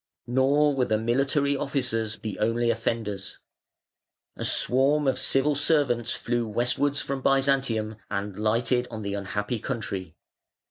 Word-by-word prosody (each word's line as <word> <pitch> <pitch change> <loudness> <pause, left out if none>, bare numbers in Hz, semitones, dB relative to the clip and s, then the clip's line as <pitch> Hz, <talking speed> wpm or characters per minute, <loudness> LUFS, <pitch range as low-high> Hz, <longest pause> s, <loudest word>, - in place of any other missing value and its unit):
Nor 140 +4 +3
were 130 -2 +2
the 110 - +1
military 135 +5 +1
officers 125 -6 -1
the 110 -2 -6
only 115 +2 +1
offenders. 110 -3 -3 1.0
A - - -5
swarm 140 +3 +2
of 135 - +1
civil 135 +2 +2
servants 140 -5 +2
flew 120 -1 -2
westwards 125 +6 0
from 135 -1 -4
Byzantium 135 -6 +1
and 100 -1 -3
lighted 115 +4 +1
on 110 -2 -6
the 100 0 -3
unhappy 105 +3 -3
country. 100 - -5
120 Hz, 130 wpm, -26 LUFS, 110-135 Hz, 1.0 s, Nor